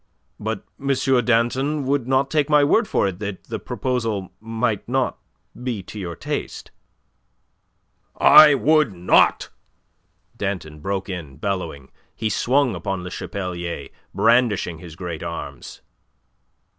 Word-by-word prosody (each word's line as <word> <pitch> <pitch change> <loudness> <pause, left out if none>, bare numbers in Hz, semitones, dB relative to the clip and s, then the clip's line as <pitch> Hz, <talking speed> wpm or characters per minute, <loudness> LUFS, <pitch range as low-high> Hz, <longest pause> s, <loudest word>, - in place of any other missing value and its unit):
"But 110 -1 -4
M. 135 -3 +1
Danton 130 +5 +1
would 135 -2 0
not 135 +1 +1
take 150 -2 +1
my 150 -1 +5
word 210 +10 +3
for - - +1
it 95 -2 -5
that 105 -2 -5
the - - -5
proposal 115 -7 -2
might 115 -1 -2
not 130 0 0 0.4
be 120 -6 -3
to 105 - -9
your 85 -3 -5
taste." - - -5 1.5
"I 150 -2 +8
would 150 -4 +3
not!" 90 0 +3 0.9
Danton 90 -7 -4
broke 95 +4 -3
in, 80 -8 -7
bellowing. 85 -9 -4 0.2
He 110 -1 -2
swung 130 +3 +2
upon 95 -2 -3
Le 90 - -7
Chapelier, 85 -9 -5 0.2
brandishing 105 -5 +2
his 80 -2 -11
great 85 -2 -6
arms. 85 -1 -7
110 Hz, 125 wpm, -22 LUFS, 90-130 Hz, 1.5 s, I